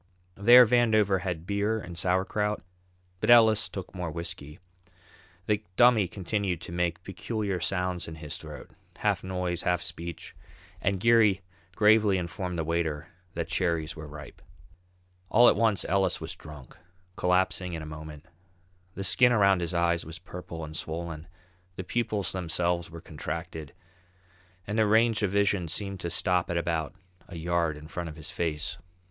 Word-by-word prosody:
There 120 +6 +8
Vandover 110 -5 +3
had 85 -3 -4
beer 105 +3 0
and 90 -4 -8
sauerkraut, 95 +4 0 0.6
but - - -1
Ellis 110 -3 +6
took 95 -2 -7
more 90 -3 -4
whisky. 85 -2 -6 0.9
The 105 0 0
Dummy 120 -5 +5
continued 95 -1 -2
to - - -7
make 85 0 -1
peculiar 100 0 -3
sounds 90 0 -1
in 80 - -7
his 75 -2 -6
throat, - - -10 0.3
half - - 0
noise, 90 -2 -2
half 90 -1 0
speech, 85 -1 -7 0.5
and 100 -1 0
Geary 110 -3 +4 0.3
gravely 105 -2 +5
informed 90 0 -4
the 80 - 0
waiter 80 -1 -2 0.3
that 85 0 -2
cherries 85 -4 -1
were 80 -1 -8
ripe. 75 -1 -11 0.9
All 120 +3 +6
at - - +6
once 110 -4 +2
Ellis 95 -1 +1
was 80 +1 -5
drunk, 75 -5 -12 0.4
collapsing 90 0 +1
in 80 -1 -4
a - - -7
moment. 75 0 -9 0.7
The 95 - -4
skin 125 +6 +4
around 100 -5 +4
his 85 +1 -2
eyes 85 0 +2
was 80 +1 -8
purple 85 -2 -8
and 80 0 -9
swollen, 80 0 -5 0.5
the 95 - -5
pupils 105 0 -1
themselves 85 -1 -1
were 85 0 -10
contracted, 80 0 -6 0.9
and 105 +3 -2
their 110 - +4
range 110 +1 +3
of 105 - +1
vision 100 -2 +1
seemed 100 +3 -3
to 85 - -3
stop 90 +1 +1
at 85 - -1
about 85 -3 -2 0.3
a 85 - -8
yard 85 -2 0
in 75 +1 -11
front 85 0 -5
of 75 - -9
his 80 -2 -4
face. 80 -3 -3
90 Hz, 155 wpm, -28 LUFS, 85-100 Hz, 0.9 s, There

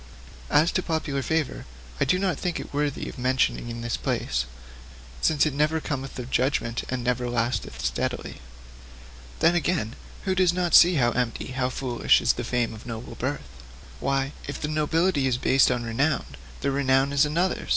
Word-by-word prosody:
As 150 +4 +4
to 185 - 0
popular 155 -5 -2
favour, 150 - -2 0.3
I - - +3
do 185 - +2
not 185 -2 -1
think 175 -1 -2
it - - -5
even 145 - -3
worthy 145 -2 -1
of - - -8
mention 130 +1 +2
in 120 0 -6
this 120 -1 -2
place, - - -1 0.8
since 155 -2 +3
it 155 - 0
never 150 +3 +1
cometh 135 -4 -4
of 125 0 -6
judgment, 125 -3 0
and 130 -1 -2
never 125 0 0
lasteth 115 - -2
steadily. - - -3 1.0
'Then, 165 - +5
again, 165 -9 0 0.3
who 190 - 0
does 185 -2 +3
not 175 -2 -1
see 175 +1 +8
how 120 -5 +3
empty, 125 0 -2
how 130 0 0
foolish, 125 -2 +2
is 120 - +3
the 120 - -4
fame 120 -1 -1
of 110 +2 -11
noble 115 0 -6
birth? - - -5 0.4
Why, 135 0 0 0.2
if 145 - -5
the 150 - -2
nobility 155 0 +1
is 125 -2 +1
based 130 +1 +4
on 125 -2 0
renown, 135 +6 0 0.4
the 140 - 0
renown 135 0 +2
is 140 +1 +4
another's! 170 +5 0
135 Hz, 180 wpm, -25 LUFS, 120-155 Hz, 1.0 s, see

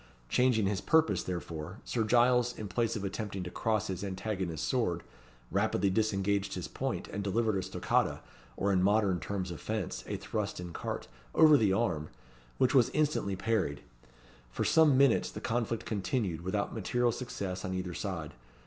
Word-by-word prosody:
Changing 125 - +3
his 100 0 0
purpose, 160 0 +3
therefore, 85 0 -5
Sir 115 - 0
Giles, 125 +2 +3
in 105 - -5
place 115 +4 0
of 105 - -4
attempting 100 -1 -3
to 90 - -6
cross 110 -2 0
his 95 -2 -4
antagonist's 95 -3 -3
sword, 90 -10 0 0.5
rapidly 100 - +1
disengaged 100 -1 0
his - - -4
point, - - -3
and 100 - -4
delivered 110 +2 +1
a 95 - 0
stoccata, - - 0 0.4
or 100 0 +1
in 90 - +3
modern 100 -2 +3
terms 95 -2 -3
of 85 - -7
fence, 110 -4 -3
a - - -2
thrust - - -3
in 90 -1 -6
carte, - - -4 0.3
over 155 -1 +8
the 110 -8 +4
arm, 85 -8 0 0.5
which 130 +1 +3
was 125 -4 +5
instantly 150 -10 +1
parried. 95 -8 -1 0.7
For - - -2
some 155 -4 +5
minutes 135 -3 +4
the - - -7
conflict 115 -1 -1
continued 100 - -1
without 100 +3 -2
material 120 +3 +1
success 100 -7 -4
on 95 0 -3
either 90 -1 -3
side. 85 -6 -4
100 Hz, 165 wpm, -31 LUFS, 95-115 Hz, 0.7 s, over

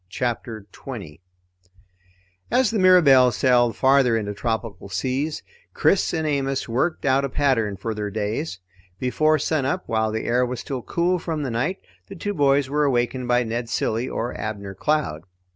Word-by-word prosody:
CHAPTER 115 -1 -3
20 100 - -9 1.3
As 245 -2 +2
the 220 - 0
Mirabelle 150 -9 +6
sailed 120 -2 +2
farther 130 -3 +4
into 105 -2 -3
tropical 110 -2 -4
seas, 130 - -2 0.3
Chris 195 - +2
and 160 -2 -1
Amos 135 -2 -1
worked 130 +9 -1
out 135 0 +3
a 140 - -1
pattern 115 -8 +1
for 110 +4 -3
their 105 -1 -3
days. 105 - -3 0.4
Before 155 +7 +2
sunup, 155 +4 -1
while 110 -1 0
the 110 +1 -3
air 125 +2 +2
was 125 0 -3
still 135 -3 -5
cool 175 +7 0
from 160 -3 -3
the 130 - -3
night, 135 +12 -2 0.3
the 195 - -9
two 205 +3 -3
boys 140 -4 +3
were 150 +2 0
awakened 125 -2 0
by 120 0 +3
Ned 115 +1 -3
Cilley 115 +3 -1
or 120 +2 -3
Abner 100 -2 -5
Cloud. 140 - -1
125 Hz, 160 wpm, -23 LUFS, 115-150 Hz, 1.3 s, Mirabelle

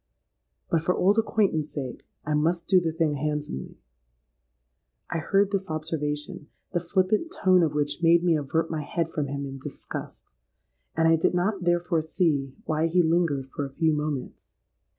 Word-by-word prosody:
But 165 - +3
for 180 +3 +1
old 200 +4 +3
acquaintance' 195 -9 +1
sake 130 -4 -6 0.2
I 150 - -1
must 165 +3 +1
do 185 -1 +5
the 165 -2 -1
thing 160 -2 0
handsomely.'—I - - -8
heard 195 +5 +2
his 195 -3 -2
observation, 150 -2 -3 0.3
the 175 - +2
flippant 190 - 0
tone 185 - +4
of 155 -3 +1
which 145 +2 -1
made 170 0 +5
me 170 -2 +4
avert 160 +3 -1
my 155 -2 -2
head 165 +2 -2
from 150 -3 -2
him 140 0 -4
in 135 0 -7
disgust; - - -7 0.7
and 165 - +4
I 165 0 +5
did 165 - +1
not 185 +1 0
therefore 175 -1 +2
see 155 -5 0
why 155 +1 +1
he 175 +2 +3
lingered 160 -5 +1
for 145 - -3
a 135 -1 -6
few 160 -1 +2
moments. 150 -3 -4
160 Hz, 165 wpm, -26 LUFS, 145-175 Hz, 0.7 s, do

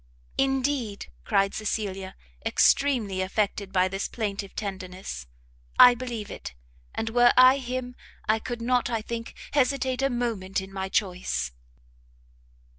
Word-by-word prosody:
"Indeed," 270 -5 0
cried 195 -2 +2
Cecilia, 195 -3 -3 0.3
extremely 225 -3 +3
affected 200 0 -1
by 185 -1 +3
this 195 +1 -3
plaintive 200 -3 -4
tenderness, 185 - -6 0.5
"I 245 - +10
believe 235 -4 -5
it - - -8 0.4
and 225 0 -2
were 240 +1 +6
I 255 +2 +8
him, 250 -1 -4 0.3
I 220 +1 +3
could 235 +1 -5
not, 245 0 +2
I 225 -2 -1
think, 230 0 -5 0.2
hesitate 265 -2 +1
a 275 - +2
moment 230 -7 -1
in 190 0 -9
my 190 0 -3
choice!" 180 - -1
220 Hz, 125 wpm, -26 LUFS, 195-250 Hz, 0.5 s, I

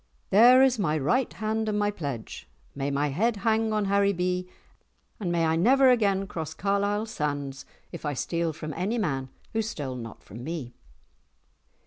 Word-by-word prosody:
"There 245 +6 +8
is 255 -3 +3
my 155 -6 +1
right 235 - +1
hand 220 0 -2
and 205 -1 0
pledge! 140 -8 -6 0.2
May 140 0 -2
my 145 +1 0
head 220 - +1
hang 220 0 +2
on 210 -1 +1
Haribee, 185 -2 +1 0.7
and 185 -5 -2
may 170 -1 +2
I 160 0 +2
never 255 +9 +5
again 200 -5 +2
cross 160 -4 -6
Carlisle 200 +2 0
sands 145 -9 -4 0.2
if - - -8
I 145 -2 -2
steal 170 +4 -1
from 155 -1 -6
any 200 - -1
man 135 - -1 0.2
who 225 - +1
stole 150 - -4
not 115 -2 -9
from 115 +5 -10
me." 145 -5 -5
180 Hz, 160 wpm, -27 LUFS, 150-215 Hz, 0.7 s, There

